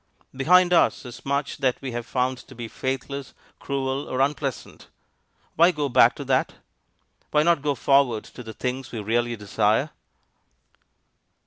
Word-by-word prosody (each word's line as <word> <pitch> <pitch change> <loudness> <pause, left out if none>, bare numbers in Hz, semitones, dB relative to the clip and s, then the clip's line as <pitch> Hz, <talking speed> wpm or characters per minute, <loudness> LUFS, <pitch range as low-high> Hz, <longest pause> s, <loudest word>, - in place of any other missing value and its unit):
Behind 180 +6 +4
us 170 - +3
is 120 - -10
much 140 +1 -1
that 130 -3 +1
we 135 -2 -5
have 120 0 -5
found 130 0 -1
to 130 - -14
be 120 -1 -6
faithless, 135 +3 -5 0.2
cruel, 135 0 -3
or 130 - -3
unpleasant. 135 -1 -2 0.7
Why 170 +2 +6
go 150 -5 -2
back - - +5
to - - -7
that? - - 0 0.7
Why 150 - +3
not 170 -2 +3
go 145 -1 0
forward 135 -4 +2
to - - -12
the 110 -2 -9
things 130 +2 -4
we 115 - -5
really 120 +3 0
desire? 110 +6 0
135 Hz, 150 wpm, -24 LUFS, 120-140 Hz, 0.7 s, Why